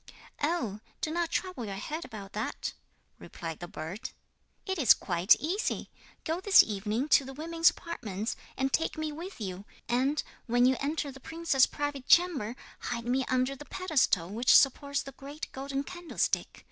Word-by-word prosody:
'Oh! 275 Hz, -, 0 dB, 0.2 s
do 310 Hz, -, -2 dB
not 340 Hz, 0 st, 0 dB
trouble 365 Hz, -9 st, -2 dB
your 200 Hz, -2 st, -4 dB
head 305 Hz, +11 st, -4 dB
about 200 Hz, -2 st, -9 dB
that,' 215 Hz, +2 st, -3 dB, 0.5 s
replied 165 Hz, -2 st, -7 dB
the 175 Hz, -, -6 dB
bird, 175 Hz, +9 st, -6 dB, 0.6 s
'it 380 Hz, -3 st, -2 dB
is 255 Hz, -7 st, +7 dB
quite 175 Hz, +2 st, +4 dB
easy! 370 Hz, +8 st, -2 dB, 0.3 s
Go 325 Hz, +2 st, -1 dB
this 400 Hz, 0 st, +8 dB
evening 215 Hz, +5 st, -2 dB
to 280 Hz, -, +6 dB
the 270 Hz, +1 st, -8 dB
women's 330 Hz, +2 st, +3 dB
apartments, 220 Hz, -, -4 dB, 0.2 s
and 265 Hz, +1 st, 0 dB
take 325 Hz, -, +1 dB
me 310 Hz, -1 st, -2 dB
with 340 Hz, +4 st, -8 dB
you, 190 Hz, -2 st, -5 dB, 0.2 s
and 265 Hz, +5 st, +1 dB, 0.2 s
when 245 Hz, +1 st, +4 dB
you 260 Hz, +1 st, +5 dB
enter 290 Hz, 0 st, -2 dB
the 270 Hz, -, -12 dB
princess's 320 Hz, -3 st, +2 dB
private 290 Hz, -2 st, -4 dB
chamber 300 Hz, -11 st, +4 dB, 0.2 s
hide 235 Hz, -1 st, -4 dB
me 255 Hz, +2 st, +1 dB
under 255 Hz, +1 st, +1 dB
the 295 Hz, +2 st, -11 dB
pedestal 300 Hz, -, +1 dB
which 235 Hz, +4 st, +4 dB
supports 280 Hz, +1 st, +2 dB
the 275 Hz, -, -8 dB
great 280 Hz, +3 st, -8 dB
golden 275 Hz, +1 st, -3 dB
candlestick. 350 Hz, +2 st, -2 dB
270 Hz, 165 wpm, -30 LUFS, 225-320 Hz, 0.6 s, this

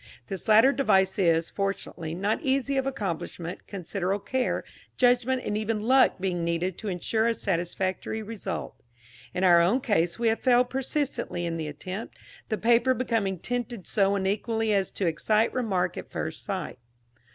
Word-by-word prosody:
This 195 Hz, -3 st, -5 dB
latter 225 Hz, +5 st, +7 dB
device 190 Hz, -9 st, +2 dB
is, 165 Hz, -3 st, +2 dB
fortunately, 195 Hz, -5 st, -3 dB
not 200 Hz, +4 st, 0 dB
easy 275 Hz, -1 st, 0 dB
of 265 Hz, 0 st, 0 dB
accomplishment, 180 Hz, -7 st, -4 dB
considerable 195 Hz, +1 st, -3 dB
care, 260 Hz, -1 st, 0 dB, 0.3 s
judgment 250 Hz, +1 st, +3 dB
and 205 Hz, -, -1 dB
even 215 Hz, 0 st, -1 dB
luck 260 Hz, +3 st, +5 dB
being 180 Hz, -2 st, -1 dB
needed 170 Hz, +2 st, -1 dB
to 215 Hz, -, -6 dB
ensure 220 Hz, +4 st, 0 dB
a 230 Hz, -, +1 dB
satisfactory 185 Hz, +3 st, -2 dB
result. 215 Hz, -1 st, -6 dB, 0.5 s
In 180 Hz, -, -2 dB
our 175 Hz, -2 st, +7 dB
own 195 Hz, +10 st, +3 dB
case 175 Hz, -9 st, +1 dB
we 230 Hz, -1 st, +2 dB
have 225 Hz, -, 0 dB
failed 250 Hz, -1 st, +3 dB
persistently 265 Hz, -, -2 dB
in 165 Hz, -1 st, -2 dB
the 160 Hz, -2 st, -3 dB
attempt, 185 Hz, +8 st, -7 dB, 0.3 s
the 215 Hz, -, 0 dB
paper 240 Hz, +3 st, +3 dB
becoming 220 Hz, -6 st, 0 dB
tinted 240 Hz, 0 st, -4 dB
so 200 Hz, -1 st, +2 dB
unequally 215 Hz, +3 st, 0 dB
as 195 Hz, -1 st, +1 dB
to 195 Hz, -, -3 dB
excite 210 Hz, +7 st, +2 dB
remark 210 Hz, -8 st, 0 dB
at -, -, -7 dB
first -, -, -4 dB
sight. -, -, -4 dB
205 Hz, 160 wpm, -27 LUFS, 185-240 Hz, 0.5 s, latter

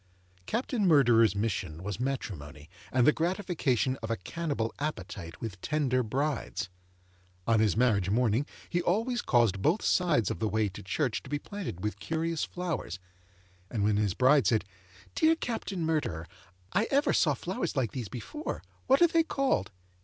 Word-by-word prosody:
Captain 230 Hz, -3 st, 0 dB
Murderer's 120 Hz, -, +5 dB
mission 95 Hz, -6 st, -2 dB
was 105 Hz, +2 st, -4 dB
matrimony, 90 Hz, -, -4 dB, 0.2 s
and 125 Hz, -1 st, +3 dB
the 150 Hz, -, +7 dB
gratification 160 Hz, -, 0 dB
of 115 Hz, -, -5 dB
a 115 Hz, -, +1 dB
cannibal 115 Hz, -, -3 dB
appetite 95 Hz, -, -5 dB
with 95 Hz, -6 st, -6 dB
tender 140 Hz, -4 st, +1 dB
brides. 130 Hz, -3 st, -2 dB, 0.8 s
On 115 Hz, -1 st, +3 dB
his 105 Hz, -2 st, +2 dB
marriage 105 Hz, -6 st, +3 dB
morning, 120 Hz, +5 st, +2 dB, 0.2 s
he 175 Hz, -, 0 dB
always 230 Hz, +8 st, +1 dB
caused 115 Hz, -6 st, +2 dB
both 170 Hz, -, +2 dB
sides 150 Hz, -, +2 dB
of -, -, -4 dB
the 110 Hz, -, +1 dB
way 110 Hz, -1 st, +1 dB
to 95 Hz, -, -9 dB
church 120 Hz, -, -1 dB
to -, -, -13 dB
be 145 Hz, -, 0 dB
planted 180 Hz, -, -6 dB
with 105 Hz, -, -2 dB
curious 165 Hz, 0 st, -1 dB
flowers; 170 Hz, -, -3 dB, 0.7 s
and 110 Hz, -4 st, -1 dB
when 105 Hz, 0 st, +3 dB
his 105 Hz, -3 st, +1 dB
bride 135 Hz, +2 st, +5 dB
said, 110 Hz, -3 st, +2 dB, 0.5 s
'Dear 320 Hz, +1 st, +4 dB
Captain 210 Hz, -, -3 dB
Murderer, 150 Hz, -, -1 dB, 0.5 s
I 210 Hz, -, +3 dB
ever 280 Hz, +1 st, +3 dB
saw 150 Hz, -4 st, +3 dB
flowers 175 Hz, +4 st, -3 dB
like 130 Hz, -6 st, 0 dB
these 120 Hz, -7 st, -5 dB
before: 215 Hz, -, -5 dB, 0.2 s
what 270 Hz, +5 st, +5 dB
are -, -, +8 dB
they 330 Hz, 0 st, +3 dB
called? 275 Hz, -4 st, 0 dB
130 Hz, 160 wpm, -30 LUFS, 105-170 Hz, 0.8 s, are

